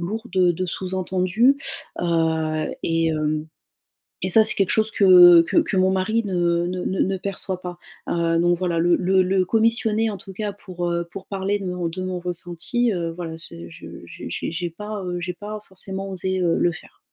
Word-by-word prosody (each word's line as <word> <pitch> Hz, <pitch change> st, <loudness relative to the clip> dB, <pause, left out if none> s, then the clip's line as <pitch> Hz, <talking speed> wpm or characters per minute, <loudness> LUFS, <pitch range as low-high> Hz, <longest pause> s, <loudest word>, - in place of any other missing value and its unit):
lourd 220 Hz, +7 st, -4 dB
de 180 Hz, -2 st, +4 dB
de 185 Hz, +2 st, -3 dB
sous-entendu, 185 Hz, +7 st, +1 dB, 0.4 s
heu 160 Hz, -2 st, 0 dB
et 165 Hz, 0 st, +1 dB
hem, 155 Hz, 0 st, -1 dB, 0.8 s
et 185 Hz, -, 0 dB
ça 220 Hz, +4 st, +6 dB
c'est 215 Hz, -, +5 dB
quelque 195 Hz, -2 st, +2 dB
chose 220 Hz, 0 st, +2 dB
que 180 Hz, -3 st, +8 dB
que -, -, +1 dB
que 200 Hz, -, 0 dB
mon 185 Hz, 0 st, +3 dB
mari 205 Hz, +5 st, 0 dB
ne 175 Hz, -2 st, 0 dB
ne 180 Hz, 0 st, -3 dB
ne 190 Hz, 0 st, 0 dB
perçoit 190 Hz, -1 st, -3 dB
pas. 175 Hz, -1 st, -7 dB, 0.3 s
Heu, 165 Hz, -1 st, +1 dB
donc 175 Hz, 0 st, +2 dB
voilà, 175 Hz, -2 st, -1 dB
le 175 Hz, +1 st, +3 dB
le 190 Hz, +1 st, +2 dB
le 185 Hz, 0 st, +1 dB
commissionner 225 Hz, 0 st, +2 dB
en 200 Hz, -, -6 dB
tout 195 Hz, 0 st, -11 dB
cas 210 Hz, 0 st, -3 dB
pour, 175 Hz, -3 st, -5 dB
heu, 170 Hz, 0 st, -1 dB
pour 195 Hz, -, -8 dB
parler 195 Hz, +1 st, -2 dB
de 195 Hz, -, -6 dB
mon 180 Hz, -2 st, -2 dB
de 185 Hz, +3 st, -6 dB
mon 185 Hz, -1 st, -3 dB
ressenti, 180 Hz, +7 st, -1 dB
heu 170 Hz, -2 st, -2 dB
voilà, 165 Hz, -1 st, -6 dB
c 85 Hz, -, -8 dB
je -, -, -12 dB, 0.2 s
j'ai -, -, -5 dB
j'ai 170 Hz, 0 st, -3 dB
pas, 210 Hz, +3 st, -6 dB
heu, 175 Hz, -1 st, -3 dB
j'ai 180 Hz, +1 st, -3 dB
pas 210 Hz, +2 st, -7 dB
forcément 190 Hz, +1 st, -5 dB
osé, 190 Hz, 0 st, -2 dB
heu, 170 Hz, -2 st, +1 dB
le 175 Hz, -, +2 dB
faire. -, -, -14 dB
185 Hz, 195 wpm, -22 LUFS, 170-195 Hz, 0.8 s, que